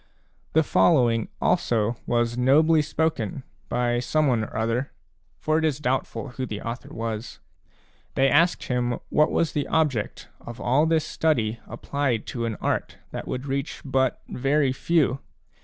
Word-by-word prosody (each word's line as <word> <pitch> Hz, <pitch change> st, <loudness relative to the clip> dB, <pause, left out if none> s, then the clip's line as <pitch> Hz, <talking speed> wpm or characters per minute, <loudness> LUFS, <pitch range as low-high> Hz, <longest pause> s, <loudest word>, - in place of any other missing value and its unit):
The 160 Hz, -, +5 dB
following 120 Hz, -9 st, +3 dB
also 115 Hz, -10 st, +1 dB
was 120 Hz, 0 st, +1 dB
nobly 155 Hz, +6 st, +4 dB
spoken 145 Hz, -6 st, -1 dB, 0.3 s
by 120 Hz, 0 st, +1 dB
someone 125 Hz, -3 st, +1 dB
orother, 115 Hz, +5 st, -1 dB, 0.5 s
for 155 Hz, -, +1 dB
it -, -, -2 dB
is 150 Hz, -3 st, +1 dB
doubtful 130 Hz, 0 st, -2 dB
who 130 Hz, +1 st, -5 dB
the 105 Hz, -2 st, -5 dB
author 115 Hz, +3 st, -6 dB
was; 115 Hz, 0 st, -5 dB, 0.8 s
they 135 Hz, -, +4 dB
asked 165 Hz, +6 st, +3 dB
him 125 Hz, -1 st, -1 dB
what 150 Hz, -, +3 dB
was 165 Hz, -, +1 dB
the 145 Hz, -2 st, -2 dB
object 145 Hz, -10 st, 0 dB
of 120 Hz, 0 st, -10 dB
all 140 Hz, +6 st, +2 dB
this 160 Hz, -1 st, +2 dB
study 115 Hz, -8 st, 0 dB
applied 125 Hz, 0 st, -2 dB
to 120 Hz, -2 st, -2 dB
an 115 Hz, -2 st, -2 dB
art -, -, -2 dB
that -, -, -6 dB
would 130 Hz, +2 st, -4 dB
reach 140 Hz, +1 st, -3 dB
but 130 Hz, -1 st, 0 dB
very 135 Hz, +1 st, +1 dB
few. 140 Hz, -2 st, +1 dB
130 Hz, 145 wpm, -25 LUFS, 120-150 Hz, 0.8 s, The